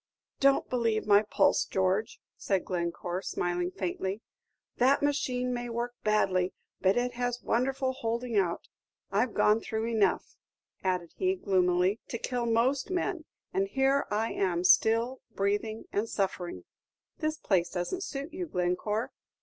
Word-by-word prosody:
"Don't 275 0 +4
believe 230 -3 0
my 205 0 +6
pulse, 215 - +3
George," 190 +3 0 0.2
said 195 -2 -1
Glencore, 175 0 -2
smiling 175 -1 -1
faintly. 190 +3 -3 0.5
"The 265 +3 +5
machine 250 -3 0
may 240 0 -3
work 235 +1 -3
badly, 190 -4 +2 0.3
but 190 +3 +3
it 245 0 0
has 245 0 -2
wonderful 260 +2 0
holding 235 -1 -3
out. 180 -4 0 0.4
I - - +3
've 225 - -15
gone 210 +1 +4
through 220 0 -3
enough," 225 -3 +1 0.5
added 180 -3 -1
he, 375 0 +1
gloomily, 185 - +2
"to 235 - -4
kill 245 0 -2
most 250 +6 +2
men, 360 -2 -2 0.3
and 195 +1 +1
here 270 +5 +2
I 220 +2 0
am 180 -3 0
still, 230 +7 +4
breathing 205 +3 -1
and 210 +3 0
suffering." 190 -3 -2 0.6
"This 310 0 -1
place 180 -4 +1
doesn't 185 - -3
suit 285 +1 -5
you, 360 0 -4
Glencore. 185 - -1
220 Hz, 140 wpm, -29 LUFS, 190-250 Hz, 0.6 s, my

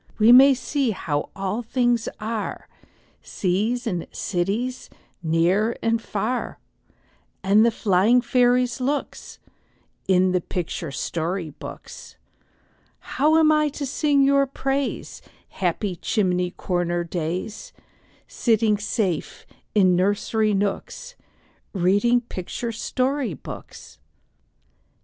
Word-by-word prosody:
We 220 +2 +6
may 265 +2 +8
see 265 +1 -1
how 155 -8 -2
all 195 +3 -2
things 240 -1 0
are, 220 0 -4 0.5
Seas 215 +7 -1
and 180 -7 -3
cities, 205 +8 -2 0.3
near 175 +7 +1
and 230 0 +1
far, 225 +4 -3 0.9
And 200 +3 +5
the 235 - +5
flying 215 +2 +3
fairies' 250 0 +2
looks, 280 +3 -3 0.7
In 185 -1 +3
the 180 -1 +1
picture 170 -2 -4
story 165 +4 -3
books. - - -11 0.8
How 305 +4 +1
am 315 -1 +5
I 305 -1 +3
to 285 0 -5
sing 285 +1 +2
your 275 0 +3
praise, 270 +1 -3 0.3
Happy 185 +1 -2
chimney 180 -2 0
corner 175 -1 -2
days, 175 +4 -4 0.6
Sitting 220 -3 +1
safe 205 -6 -2 0.3
in 185 -3 +5
nursery 205 +3 +1
nooks, 205 - -3 0.6
Reading 205 +7 +3
picture 230 +2 -5
story 255 +3 -1
books? - - -11
215 Hz, 105 wpm, -23 LUFS, 185-250 Hz, 0.9 s, may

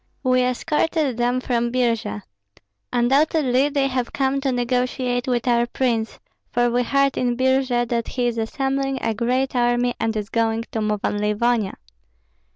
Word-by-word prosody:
"We 255 -1 +3
escorted 275 +2 0
them 245 +1 +1
from 240 -2 0
Birji. 230 - -1 0.7
Undoubtedly 270 +2 +2
they 280 -1 +1
have 255 -2 -2
come 275 0 0
to 270 -1 0
negotiate 250 +1 -1
with 245 -1 0
our 240 -1 +3
prince, 235 -3 -1 0.3
for 240 -1 +1
we 245 +1 +2
heard 275 +2 +1
in 245 -1 0
Birji 260 -2 +1
that 235 -1 -1
he 250 -2 -2
is 235 -1 -1
assembling 270 +3 -1
a 225 - +1
great 255 +5 0
army 240 0 +2
and 225 -1 -1
is 210 0 -4
going 225 0 0
to 220 - -2
move 210 -1 -1
on 205 - 0
Livonia." 210 0 +1
245 Hz, 160 wpm, -22 LUFS, 235-265 Hz, 0.7 s, We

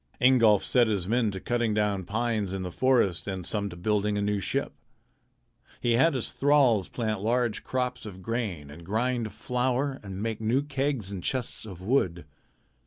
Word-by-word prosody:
Ingolf 115 -5 +5
set 120 -2 +3
his 100 -5 -1
men 115 0 +2
to 95 -1 -5
cutting 120 0 0
down 105 -3 0
pines 110 -2 -1
in 95 -1 -3
the 90 - -5
forest 115 -7 +2
and 95 -3 -4
some 100 +1 -2
to 85 - -9
building 105 +3 0
a - - 0
new 105 0 0
ship. 95 - -2 1.1
He 120 - 0
had 135 +6 +4
his 125 - -2
thralls 135 -8 +3
plant 110 -4 -2
large 120 +1 0
crops 125 -2 -2
of 95 -2 -10
grain 100 -11 -3
and 85 +3 -11
grind 115 +4 -1
flour 130 +2 -1
and 95 -2 -7
make 110 -1 -3
new 120 +6 +1
kegs 135 -7 -1
and 95 -3 -6
chests 125 -3 -1
of 90 -3 -9
wood. 95 - 0
110 Hz, 175 wpm, -27 LUFS, 100-125 Hz, 1.1 s, Ingolf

